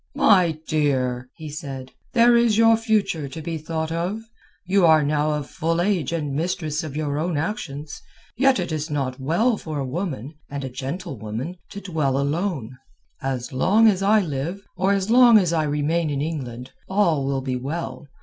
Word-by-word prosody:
"My 180 -7 +4
dear," 130 -5 0
he 160 - -8
said, 135 -4 -7 0.2
"there 240 0 +6
is 235 -2 +3
your 225 0 +6
future 210 - 0
to 145 - -7
be 160 0 -4
thought 160 +1 -3
of. 175 +6 -2 0.4
You 190 +1 +3
are 160 -2 +6
now 150 +1 +1
of 150 -2 -3
full 165 +1 -1
age 175 -6 +1
and 150 -4 -2
mistress 155 0 -2
of 150 -3 -6
your 150 -1 -1
own 165 -1 -1
actions. 150 -4 -4 0.3
Yet 265 +1 +3
it 175 -2 -3
is 155 +1 -3
not 135 -3 -2
well 210 - +1
for 155 -5 -6
a 140 - -2
woman 145 - -4 0.2
and 140 0 -5
a 130 - -4
gentlewoman 135 - -5
to 200 - -8
dwell 155 -8 0
alone. 140 - -2 0.4
As 130 -1 -3
long 205 +12 +4
as 195 -3 +3
I 210 +2 +4
live, 170 +4 -4
or 190 +1 +1
as 200 +1 0
long 240 -2 +8
as 180 -5 +2
I 160 -2 +1
remain 150 +3 0
in 140 -1 -2
England, 130 -5 -4 0.2
all 190 -8 +2
will 135 -1 0
be 130 -1 -2
well. 145 +4 -5
155 Hz, 180 wpm, -23 LUFS, 140-185 Hz, 0.4 s, long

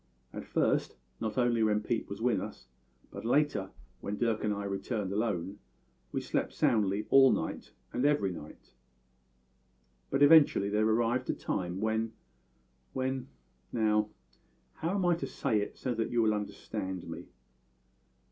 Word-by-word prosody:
At - - -7
first, - - +1 0.2
not 110 +2 -3
only 120 -2 +2
when 105 -1 +3
Pete 115 +1 -2
was 100 +3 -6
with 115 -6 +2
us, - - -8 0.5
but - - -7
later, 125 -5 +1 0.3
when 105 +1 -4
Dirk 115 -2 0
and 105 - +1
I 100 0 -2
returned 100 +1 -3
alone, 100 -2 -1 0.5
we - - -2
slept - - -2
soundly 105 -1 +2
all 135 -1 +8
night - - -3 0.2
and 125 - -1
every 145 -10 +3
night, 80 -3 -11 1.4
but 145 - +3
eventually 145 -9 +6
there 105 +1 +2
arrived 120 +3 +1
a - - +3
time 90 +1 -3
when 110 +1 0 0.8
when 130 0 -2 0.4
Now, 105 -2 +2 0.6
how 170 +5 -2
am 190 -3 +1
I 175 - +5
to - - -4
say 110 - 0
it 100 - -5
so 125 - -2
that 115 -1 -1
you 120 -1 +2
will 110 -1 +3
understand 100 -2 -4
me?" - - -7
110 Hz, 150 wpm, -31 LUFS, 100-125 Hz, 1.4 s, all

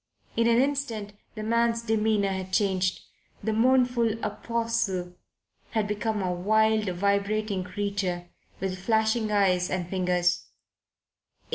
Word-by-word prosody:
In 230 0 +3
an 235 0 +4
instant 255 -7 -1 0.2
the 215 - -5
man's 230 +1 +1
demeanour 215 -3 +1
had 190 -1 -4
changed. 185 -2 +1 0.4
The 220 +1 0
mournful 245 -1 +3
apostle 215 -4 -2 0.6
had 215 -2 0
become 210 0 -1
a 180 -1 0
wild, 215 +3 +2
vibrating 200 +2 0
creature 185 -2 -3 0.3
with 185 -1 -3
flashing 220 +2 +1
eyes 185 -3 +2
and 180 -2 -2
fingers. 180 -1 +1
210 Hz, 115 wpm, -27 LUFS, 185-225 Hz, 0.6 s, an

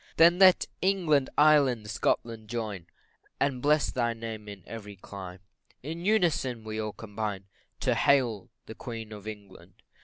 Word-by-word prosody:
Then 170 +2 +6
let 185 -2 +7 0.2
England, 170 -8 +2
Ireland, 140 -7 +4
Scotland, 115 -2 -1
join, 105 -6 -4 0.5
And 135 -3 0
bless 150 +1 +3
thy 120 -2 0
name 110 -2 -7
in 100 -3 -10
every 105 -3 -8
clime 95 -1 -9 0.4
In 165 +4 -5
unison 165 - +1
we 110 0 -5
all 110 0 -3
combine 105 -3 -5 0.4
To - - +2
hail 120 -8 +2 0.2
the - - -8
Queen 115 -2 -7
of 105 0 -10
England. 95 -4 -11
115 Hz, 145 wpm, -28 LUFS, 105-145 Hz, 0.5 s, let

